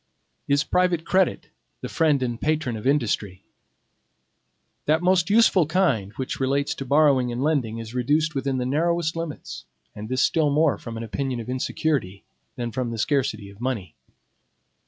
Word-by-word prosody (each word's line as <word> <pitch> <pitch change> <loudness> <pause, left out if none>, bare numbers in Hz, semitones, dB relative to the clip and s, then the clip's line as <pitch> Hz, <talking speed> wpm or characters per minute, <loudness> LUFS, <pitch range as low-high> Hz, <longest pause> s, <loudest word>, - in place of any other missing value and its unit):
Is 140 +2 +3
private 180 -2 +1
credit 190 -1 +1 0.3
the - - -4
friend 150 -5 +2
and 120 -2 -3
patron 155 -6 0
of 110 +3 -4
industry? 105 -9 0 1.4
That 160 +3 +2
most 180 0 +3
useful 205 -6 +4
kind 145 - +1
which 130 - -4
relates 140 +2 0
to 135 - -6
borrowing 140 -3 +3
and 120 +2 -2
lending 135 -8 0
is 115 0 -7
reduced 150 +6 +1
within 135 -1 -1
the 125 - -1
narrowest 165 +4 0
limits, 165 - -6 0.3
and 105 +1 -8
this 130 +1 +1
still 155 -3 +2
more 150 +1 +2
from 115 -1 -7
an 115 - -5
opinion 120 +4 -3
of 115 - -7
insecurity 130 - -2 0.3
than 120 -1 -4
from 125 0 -2
the 115 - -5
scarcity 125 -5 -1
of 100 +3 -16
money. 110 -10 -3
135 Hz, 160 wpm, -24 LUFS, 120-155 Hz, 1.4 s, useful